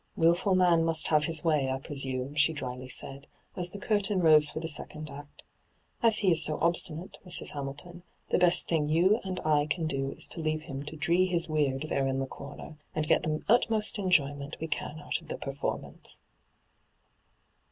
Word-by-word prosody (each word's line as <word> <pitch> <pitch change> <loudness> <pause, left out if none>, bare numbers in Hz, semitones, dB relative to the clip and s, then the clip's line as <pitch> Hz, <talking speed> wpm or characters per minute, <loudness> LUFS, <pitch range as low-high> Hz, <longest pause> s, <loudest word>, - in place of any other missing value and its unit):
' - - -43
Wilful 175 +3 +3
man 175 -3 +4
must 165 -2 +2
have 150 -1 +3
his 165 -1 0
way, 150 -5 +1
I 130 - -1
pre 135 +2 -9
sume,' 130 0 -3
she 150 +2 +3
dryly 130 -3 -6
said, 135 +2 -5 0.3
as 180 -1 -3
the 200 - -9
curtain 205 -1 0
rose 155 -3 +6
for 150 - -5
the 160 - -4
second 155 -1 -7
act. 145 +1 -12 0.3
' - - -41
As 225 -3 +5
he 195 -4 +3
is 165 -1 +5
so 155 0 +4
obstinate, 170 0 -1
Mrs. 180 -2 0
Hamilton, 145 +5 -7 0.3
the - - +2
best 180 0 +3
thing 150 -3 0
you 185 +8 +3
and 185 -1 -4
I 150 -1 +2
can 160 +1 -1
do 135 -3 -2
is - - +1
to - - -5
leave 155 0 -1
him 135 -3 -6
to 155 - -6
" - - -10
dree 175 +5 +2
his 170 -2 +2
weird 145 -3 0
" - - -13
there 135 -1 0
in 135 0 -1
the 135 - -1
comer, 140 +3 -10 0.2
and 155 0 -1
get - - +3
the 155 0 -2
utmost 220 -2 +2
enjoyment 145 -6 +1
we 160 - -4
can 155 0 -4
out 145 - -3
of - - -17
the - - -5
performance.' 135 0 -5
155 Hz, 210 wpm, -29 LUFS, 145-175 Hz, 0.3 s, rose